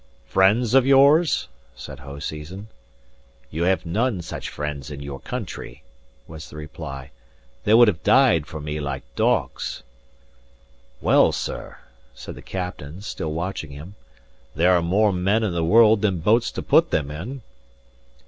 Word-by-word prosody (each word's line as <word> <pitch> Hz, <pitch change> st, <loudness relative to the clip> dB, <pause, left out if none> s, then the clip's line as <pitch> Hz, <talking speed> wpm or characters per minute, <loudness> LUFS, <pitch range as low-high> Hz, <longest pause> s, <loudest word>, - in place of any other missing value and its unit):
"Friends 105 Hz, -, +3 dB
of 135 Hz, -1 st, +6 dB
yours?" 140 Hz, +5 st, +4 dB, 0.3 s
said -, -, -9 dB
Hoseason. 75 Hz, +8 st, -7 dB, 0.8 s
"You 80 Hz, +3 st, -1 dB
have 95 Hz, 0 st, +1 dB
none 105 Hz, +2 st, -1 dB
such -, -, -6 dB
friends 75 Hz, -1 st, -5 dB
in 70 Hz, -1 st, -7 dB
your 70 Hz, -1 st, -7 dB
country," 70 Hz, -, -7 dB, 0.4 s
was 80 Hz, 0 st, -10 dB
the -, -, -13 dB
reply. 75 Hz, -3 st, -8 dB, 0.5 s
"They 105 Hz, -, +5 dB
would 120 Hz, 0 st, +7 dB
have 85 Hz, -7 st, 0 dB
died 125 Hz, -, +4 dB
for 80 Hz, -, -7 dB
me 75 Hz, +1 st, -4 dB
like 70 Hz, -3 st, -4 dB
dogs." -, -, -1 dB, 1.2 s
"Well, -, -, +4 dB
sir," -, -, -5 dB, 0.4 s
said -, -, -9 dB
the -, -, -11 dB
captain, 90 Hz, -3 st, -6 dB
still 80 Hz, -6 st, -4 dB
watching 85 Hz, -1 st, -4 dB
him, 75 Hz, +7 st, -10 dB, 0.6 s
"there 85 Hz, +5 st, +4 dB
are 90 Hz, -1 st, +4 dB
more 100 Hz, +5 st, +2 dB
men 100 Hz, +5 st, +1 dB
in 100 Hz, -5 st, -1 dB
the 85 Hz, -1 st, -1 dB
world 110 Hz, +4 st, +5 dB
than 100 Hz, -4 st, +1 dB
boats 110 Hz, +8 st, +2 dB
to -, -, -5 dB
put -, -, +4 dB
them 75 Hz, -2 st, -1 dB
in." 115 Hz, -, -7 dB
85 Hz, 150 wpm, -23 LUFS, 75-110 Hz, 1.2 s, would